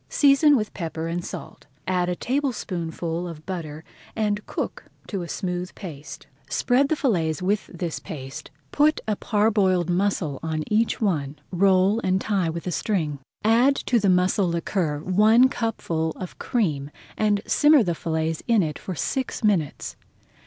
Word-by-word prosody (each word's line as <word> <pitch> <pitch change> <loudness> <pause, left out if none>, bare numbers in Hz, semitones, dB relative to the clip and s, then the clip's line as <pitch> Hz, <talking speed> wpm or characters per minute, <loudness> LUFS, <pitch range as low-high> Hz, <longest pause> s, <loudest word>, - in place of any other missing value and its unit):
Season 285 0 +5
with 215 -2 -3
pepper 165 -2 -4
and 170 +1 -3
salt, - - -8 0.2
add 180 -1 0
a 180 - -1
tablespoonful 175 - -2
of 160 -2 -9
butter, 160 -5 -5 0.3
and 210 -1 0
cook - - -4 0.2
to 195 -3 -4
a 170 - -5
smooth 180 -1 -3
paste. 155 -7 -9 0.2
Spread 250 - +2
the 315 - +2
fillets 170 - 0
with 200 +2 0
this 175 -2 -4
paste, 135 -3 -8 0.2
put 305 +1 +3
a 215 - +1
parboiled 205 -5 +2
mussel 175 -6 0
on 160 -1 -2
each 220 +3 +1
one, 150 -9 0 0.2
roll 190 +3 +3
and 185 -4 +1
tie 195 -5 0
with 170 +1 -5
a 180 - -2
string. 160 -8 -1 0.2
Add 240 +6 +4
to 245 -3 +1
the 200 -2 +2
mussel 185 +1 +3
liquor 170 -3 -1
one 215 +7 +5
cupful 165 -10 -2
of 185 - -8
cream 150 - -1 0.3
and 210 -1 +1
simmer 295 -3 +5
the 175 -3 0
fillets 160 -1 -2
in 230 -5 +4
it 150 -2 -4
for 185 - -5
six 255 - -2
minutes. 185 -9 0
185 Hz, 155 wpm, -24 LUFS, 165-215 Hz, 0.3 s, Season